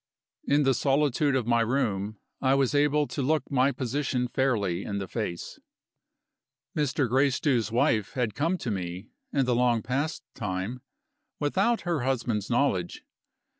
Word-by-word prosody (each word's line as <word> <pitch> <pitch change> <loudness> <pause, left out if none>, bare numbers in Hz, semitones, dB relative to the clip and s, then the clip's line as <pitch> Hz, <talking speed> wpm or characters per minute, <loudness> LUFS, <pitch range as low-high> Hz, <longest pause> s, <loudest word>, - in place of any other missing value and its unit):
In 145 +1 +4
the 135 -1 +4
solitude 140 +1 +2
of 125 -4 0
my 120 0 +3
room, 110 -4 -1 0.2
I 135 0 +3
was 135 -1 +2
able 145 +1 +3
to 145 - -4
look 150 +1 0
my 135 0 +3
position 130 -1 -1
fairly 110 -9 0
in 100 - -3
the 95 -1 -4
face. 95 -7 -5 1.2
Mr. 145 -3 +1
Gracedieu's 130 -3 +2
wife 110 -3 +1
had 120 -5 -1
come 165 +5 0
to 125 - -3
me, 90 +1 -5 0.2
in 135 -2 +2
the 125 - +1
long 120 -2 +2
past 140 +7 -2
time, 105 +4 -4 0.6
without 195 +11 +1
her 170 -3 -1
husband's 120 -5 -1
knowledge. 115 -9 0
125 Hz, 145 wpm, -27 LUFS, 110-140 Hz, 1.2 s, In